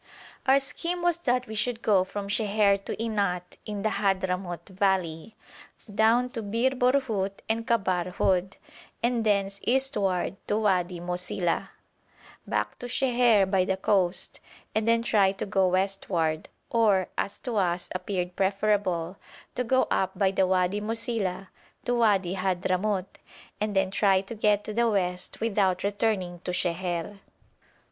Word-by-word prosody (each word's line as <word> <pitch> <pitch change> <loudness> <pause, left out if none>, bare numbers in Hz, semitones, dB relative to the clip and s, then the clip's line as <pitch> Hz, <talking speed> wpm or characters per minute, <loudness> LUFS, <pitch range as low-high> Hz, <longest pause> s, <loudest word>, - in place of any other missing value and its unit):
Our 270 +1 +6
scheme 335 +6 -3
was 350 -1 +2
that 250 -6 0
we 220 - -8
should 225 +2 -1
go 195 -4 +4
from 200 +1 -6
Sheher 200 -1 +2
to - - -3
Inat 200 -6 -2
in 205 -2 -4
the 220 - +2
Hadhramout 185 -4 -1
valley, 190 -1 -1 0.6
down 230 +4 +3
to 230 - -4
Bir 230 +5 +1
Borhut 250 -7 +1
and 225 +1 -1
Kabr 185 -6 +1
Houd, 190 0 +1 0.5
and 235 -1 +1
thence 200 -2 +1
eastward 210 -8 0
to 210 - +1
Wadi 185 -4 +1
Mosila, 175 0 -2 0.8
back 105 0 -2
to 245 - -6
Sheher 245 -5 +3
by 190 -1 +2
the 190 +1 -1
coast, 190 -2 0 0.3
and 220 0 0
then 230 0 +3
try 200 -4 +3
to 195 - -4
go 195 -2 +2
westward 185 -4 0 0.2
or, 205 -5 +3
as 200 - -2
to 240 -4 -3
us 175 -2 0
appeared 180 -1 -3
preferable, 195 -3 0 0.4
to 250 - -1
go 260 +2 +3
up 190 - 0
by 195 -2 +3
the 190 -1 +2
Wadi 185 +2 +1
Mosila 210 -4 -2 0.4
to 245 - +1
Wadi 205 -6 +2
Hadhramout, 185 +1 -1 0.4
and 210 -1 -2
then 195 -1 +2
to - - -5
try 195 -2 +4
to 195 +4 -8
get 210 -2 +2
to 215 - -5
the 235 +1 +2
west 180 -3 -2
without 195 -5 +1
returning 200 -3 -1
to 180 - -7
Sheher. 175 +2 -2
200 Hz, 150 wpm, -27 LUFS, 185-220 Hz, 0.8 s, Our